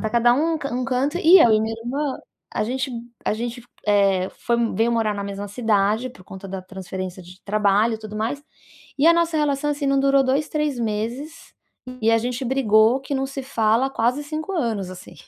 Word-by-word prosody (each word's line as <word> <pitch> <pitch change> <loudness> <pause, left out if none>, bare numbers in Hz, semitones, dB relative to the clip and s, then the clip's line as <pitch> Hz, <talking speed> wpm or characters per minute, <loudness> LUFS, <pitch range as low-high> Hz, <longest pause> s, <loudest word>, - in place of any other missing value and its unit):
tá 220 - -1
cada 240 +2 +4
um 325 +4 +1
um 255 -4 -3
canto, 270 +5 0
e 360 +2 +8
eu 230 - +6
e 215 - +4
minha 220 +1 -2
irmã 275 +3 -2 0.4
a - - 0
gente 260 +3 -2 0.4
a - - +1
gente, 240 +2 -4 0.3
eh, 195 -3 +3
foi 235 -1 -1 0.2
veio 230 +3 +2
morar 220 -2 +1
na 200 0 -4
mesma 200 0 -5
cidade, 215 +1 +1
por 185 - -16
conta 190 0 -10
da 190 -1 -6
transferência 185 0 -7
de 180 +2 -15
trabalho 210 +2 +2
e 220 - -6
tudo 215 -1 -9
mais, 230 +7 -2 0.6
e 285 - +2
a 335 - +8
nossa 335 -1 +1
relação 295 -1 0
assim, 290 0 -3
não 275 0 +2
durou 275 0 +4
2, 270 +3 0
3 300 -4 -1
meses 235 +8 -4 0.5
e 220 - +1
a 225 - +4
gente 250 +2 -3
brigou 235 -1 +3
que 275 +1 -4
não 270 0 -1
se 270 0 -6
fala 235 0 +1
quase 250 +4 0
5 310 +5 -5
anos, 225 - -2
assim. 185 0 -11
235 Hz, 205 wpm, -22 LUFS, 210-275 Hz, 0.6 s, e